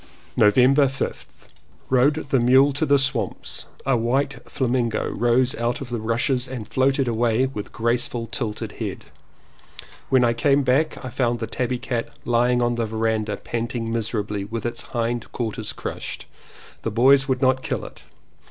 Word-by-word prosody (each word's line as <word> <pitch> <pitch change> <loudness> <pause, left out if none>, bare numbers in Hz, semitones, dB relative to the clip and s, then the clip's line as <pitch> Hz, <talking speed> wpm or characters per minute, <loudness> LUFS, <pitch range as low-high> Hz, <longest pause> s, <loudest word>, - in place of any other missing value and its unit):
November 130 +6 +5
5th. 135 +1 -6 0.4
Rode 130 +3 +4
the 135 - +3
mule 130 +4 +5
to 150 +3 -1
the 140 - +5
swamps. 135 -3 -2 0.2
A 135 -1 +3
white 125 +3 0
flamingo 120 -3 0
rose 120 +3 +2
out 120 +4 -1
of 135 -4 -8
the 120 - -2
rushes 125 +3 0
and 125 -4 -6
floated 135 0 +1
away 115 +1 +2
with 105 -6 -6
graceful 115 0 0
tilted 115 -2 -4
head. - - -6 1.0
When 130 -2 +4
I 115 - +3
came 140 +4 +2
back 135 +2 +1
I - - -4
found 120 -2 0
the 115 - -3
tabby 125 +2 -2
cat 120 -1 -3 0.2
lying 120 +1 +2
on 120 0 +1
the 115 -1 -1
verandah 110 -1 -1
panting 115 -1 -3
miserably 105 -3 -2
and 100 +3 -8
with 115 -1 -4
its 120 0 -2 0.2
hind 120 0 -2
quarters 110 -2 -3
crushed. - - -6 0.6
The - - -2
boys 135 +5 +5
would 130 -1 0
not 130 0 +3
kill - - -3
it. - - -12
120 Hz, 160 wpm, -23 LUFS, 115-130 Hz, 1.0 s, November